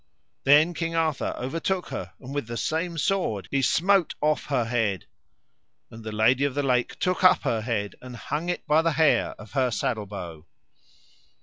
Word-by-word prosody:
Then 150 +5 +6
King 165 0 -3
Arthur 160 -3 0
overtook 165 +8 -2
her, - - -6
and 135 +1 -9
with 145 -5 -3
the 120 0 -5
same 165 +4 -2
sword 155 - -1
he 140 - +1
smote 180 +7 +2
off 155 0 +1
her 130 -5 0
head, 110 -6 -1 0.9
and 115 0 -11
the 110 - -5
Lady 115 +6 +3
of 140 -2 0
the 145 - 0
Lake 125 -2 0
took 185 +1 -1
up 185 0 +6
her 115 -2 0
head 105 -3 -2
and 125 -1 -9
hung 150 +8 -4
it 175 - -2
up - - -45
by 155 +1 +4
the 165 -1 +1
hair 155 0 +2
of 105 +1 -12
her 130 -3 +1
saddle 110 -2 -2
bow. 85 -5 -8
135 Hz, 190 wpm, -25 LUFS, 115-165 Hz, 0.9 s, Then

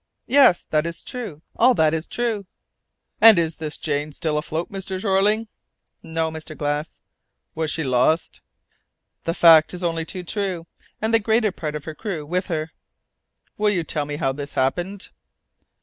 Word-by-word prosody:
"Yes; 260 -9 +5
that 155 +1 +2
is 170 - -6
true, 210 -12 -7
all 250 +2 +5
that 155 -4 +3
is 160 0 -2
true." 225 -5 -2 0.7
"And 220 -3 +9
is 165 -1 0
the 155 -1 -4
Jane 150 -1 -3
still 155 +1 -2
afloat, 155 +2 -3
Mr. 190 -1 -4
Jeorling?" 205 +3 +2 0.5
"No, 160 0 -2
Mr. 160 0 -8
Glass." 145 +1 -3 0.5
"Was 160 -1 -2
she 160 +2 -1
lost?" 130 +5 +1 0.8
"The 165 - -1
fact 165 0 +6
is 180 - -7
only 165 -1 -1
too 180 +2 -6
true, 185 -2 -3 0.4
and 220 +1 +1
the 225 - +6
greater 220 0 +2
part 155 -5 -5
of 150 - -6
her 155 - -5
crew 170 -4 -5
with 180 +4 -2
her." 160 -3 -3 0.9
"Will 210 0 +3
you 185 -5 0
tell 150 -1 -2
me 145 0 -4
how 135 -2 0
this 140 +1 -7
happened?" 175 +9 -1
165 Hz, 165 wpm, -22 LUFS, 155-195 Hz, 0.9 s, And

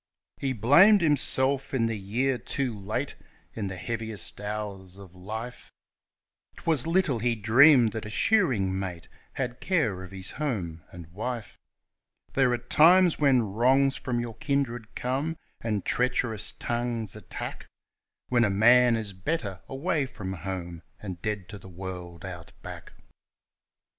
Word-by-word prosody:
He 135 - -1
blamed 170 - +6
himself 135 -3 +2
in 115 -3 +2
the 115 0 -1
year 120 +6 -1
'Too 130 +1 -2
Late' 110 +7 -3 0.4
in 105 -3 -3
the 95 - -5
heaviest 110 0 -4
hours 100 -3 -5
of 95 -3 -12
life 110 +7 -7 0.8
'Twas 160 -3 0
little 165 -8 +2
he 120 +1 +1
dreamed 120 +3 +6
that 110 -1 -5
a - - -7
shearing 110 - +2
mate 90 -3 -5 0.3
had 125 -2 -3
care 115 - 0
of 95 - -9
his 95 -1 -8
home 95 - -3
and 85 -1 -10
wife; 110 +3 -5 0.7
There 135 -2 +3
are 120 - +1
times 165 +8 +5
when 135 -5 +4
wrongs 135 +4 +3
from 125 -3 -2
your 120 -1 -4
kindred 120 -5 -2
come, 140 +6 -2 0.2
and 105 -4 -2
treacherous 120 -4 0
tongues 120 -3 -3
attack - - -7 0.6
When 120 -1 +3
a 110 - +3
man 120 +4 +5
is 110 -3 -4
better 100 - -3
away 140 +1 -1
from 95 -6 -6
home, 85 -2 -5 0.2
and 95 -5 -7
dead 105 -4 -3
to 105 - -8
the 95 - -13
world, 90 -1 -7
Out 85 -3 -8
Back. - - -9
115 Hz, 145 wpm, -27 LUFS, 100-135 Hz, 0.8 s, blamed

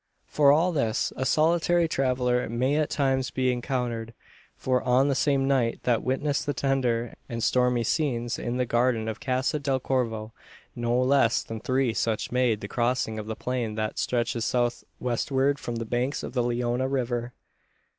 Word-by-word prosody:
For 145 -2 +4
all 165 +5 +3
this, 125 -9 0
a 130 - -1
solitary 170 +2 +3
traveller 125 -4 0
may 130 +5 +1
at 155 -1 +1
times 135 -2 0
be 130 -1 0
encountered: 120 -2 -3 0.4
for 130 -1 0
on 130 +2 +3
the - - +2
same 135 -1 +1
night 130 -4 +1
that 120 -3 +2
witnessed 145 +3 -1
the 145 - -1
tender 120 -3 0 0.2
and 115 -1 -3
stormy 125 +1 +2
scenes 120 -3 -1
in 120 +1 -3
the 125 - +1
garden 120 -1 +1
of 110 - -4
Casa 130 +3 0
del 135 -2 0
Corvo, 115 -4 -2 0.4
no 120 +1 0
less 130 -2 +3
than 115 0 -6
three 130 0 0
such 110 -1 -1
made 125 -4 +1
the 100 - -5
crossing 120 -1 -1
of 105 - -7
the 110 - -3
plain 120 -3 -3
that 110 0 -3
stretches 120 -1 -1
south 120 0 0 0.2
westward 135 +3 0
from 120 - -5
the 115 0 -3
banks 125 +5 -1
of - - -6
the 125 - +1
Leona 120 +1 0
River. 125 -2 -2
125 Hz, 175 wpm, -26 LUFS, 120-135 Hz, 0.4 s, For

